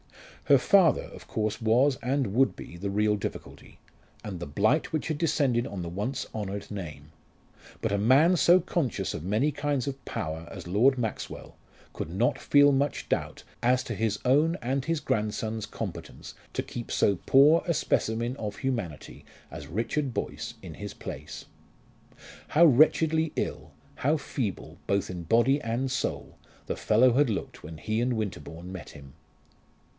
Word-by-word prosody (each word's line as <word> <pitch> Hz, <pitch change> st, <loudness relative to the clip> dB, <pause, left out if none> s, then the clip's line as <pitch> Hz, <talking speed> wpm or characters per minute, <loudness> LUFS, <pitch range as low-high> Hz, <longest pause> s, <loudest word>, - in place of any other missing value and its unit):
Her 140 Hz, -, +6 dB
father 170 Hz, -, +4 dB
of -, -, -12 dB
course 110 Hz, +1 st, -2 dB
was, 125 Hz, +5 st, +3 dB
and 125 Hz, -3 st, 0 dB
would 135 Hz, +4 st, +3 dB
be, -, -, -9 dB
the 100 Hz, +3 st, -4 dB
real 105 Hz, +1 st, +2 dB
difficulty, 100 Hz, -, -7 dB, 0.5 s
and 95 Hz, -4 st, -6 dB
the 85 Hz, -, -5 dB
blight 110 Hz, -, +1 dB
which 155 Hz, -2 st, -2 dB
had 155 Hz, -2 st, -2 dB
descended 135 Hz, -7 st, +1 dB
on 95 Hz, -3 st, -5 dB
the -, -, -5 dB
once 105 Hz, +10 st, -3 dB
honoured 100 Hz, -2 st, -5 dB
name. 75 Hz, -7 st, -7 dB, 0.7 s
But 110 Hz, -, -1 dB
a 100 Hz, -, +1 dB
man 135 Hz, -, +5 dB
so 175 Hz, +1 st, +6 dB
conscious 165 Hz, -, -2 dB
of 75 Hz, -, -5 dB
many 110 Hz, -, +1 dB
kinds 145 Hz, -2 st, -1 dB
of 135 Hz, -1 st, -5 dB
power 80 Hz, -6 st, -5 dB
as -, -, -8 dB
Lord 120 Hz, +9 st, +3 dB
Maxwell 115 Hz, -3 st, -5 dB, 0.4 s
could -, -, -5 dB
not 105 Hz, +8 st, 0 dB
feel 145 Hz, 0 st, +5 dB
much 140 Hz, +2 st, 0 dB
doubt -, -, -2 dB, 0.2 s
as 125 Hz, +1 st, +3 dB
to 115 Hz, -, -4 dB
his 105 Hz, 0 st, 0 dB
own 150 Hz, +7 st, +3 dB
and 130 Hz, +3 st, -1 dB
his 165 Hz, -1 st, 0 dB
grandson's 110 Hz, -3 st, -2 dB
competence -, -, -7 dB, 0.2 s
to -, -, -1 dB
keep 120 Hz, -1 st, -7 dB
so 100 Hz, -2 st, +2 dB
poor 150 Hz, +5 st, +6 dB
a 170 Hz, -, +2 dB
specimen 115 Hz, -3 st, 0 dB
of 105 Hz, -6 st, -5 dB
humanity 115 Hz, -, -4 dB, 0.3 s
as -, -, -8 dB
Richard 120 Hz, -, -2 dB
Boyce -, -, -4 dB
in -, -, -8 dB
his -, -, -7 dB
place. -, -, -8 dB, 1.0 s
How 170 Hz, +3 st, +6 dB
wretchedly 160 Hz, +2 st, +4 dB
ill, -, -, -3 dB, 0.3 s
how 150 Hz, +4 st, +2 dB
feeble, 120 Hz, -8 st, -4 dB
both 100 Hz, -1 st, 0 dB
in 90 Hz, -1 st, -6 dB
body 120 Hz, -, +3 dB
and 120 Hz, +4 st, -1 dB
soul, -, -, -3 dB, 0.3 s
the -, -, -3 dB
fellow 120 Hz, +3 st, +4 dB
had 140 Hz, +1 st, +3 dB
looked 105 Hz, -, -4 dB
when 80 Hz, -, -8 dB
he 110 Hz, +7 st, -1 dB
and 125 Hz, +1 st, +1 dB
Winterbourne 90 Hz, -4 st, -5 dB
met 95 Hz, -2 st, -8 dB
him! 70 Hz, -3 st, -13 dB
120 Hz, 165 wpm, -28 LUFS, 100-140 Hz, 1.0 s, Her